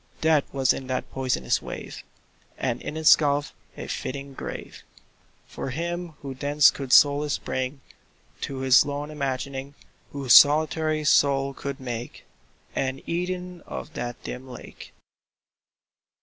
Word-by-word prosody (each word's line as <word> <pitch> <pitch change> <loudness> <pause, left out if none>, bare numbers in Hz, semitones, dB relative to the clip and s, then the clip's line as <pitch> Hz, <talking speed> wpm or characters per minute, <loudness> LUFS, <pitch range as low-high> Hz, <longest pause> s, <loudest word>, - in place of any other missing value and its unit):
Death 155 -3 +2
was 135 -2 +2
in 130 - -7
that 130 0 -3
poisonous 125 - 0
wave, - - -8 0.5
And - - -2
in 155 - -5
its 160 0 +7
gulf 145 -1 -1 0.2
a - - -6
fitting 140 +1 -5
grave - - -7 0.6
For - - -6
him 170 +4 -4
who 135 -1 -5
thence 145 +2 +4
could 135 -2 -7
solace 145 +1 +5
bring 130 +2 -4 0.6
To 135 -1 -4
his 130 -1 +6
lone 145 +1 -4
imagining— 140 -1 -4 0.4
Whose 135 -4 +2
solitary 155 +1 +5
soul 140 -2 +3
could 140 +1 -6
make 120 -2 -6 0.5
An 135 0 -2
Eden 180 +1 -3
of 160 - -7
that 120 -3 -4
dim 125 +1 -7
lake. 125 - -11
140 Hz, 130 wpm, -25 LUFS, 130-150 Hz, 0.6 s, its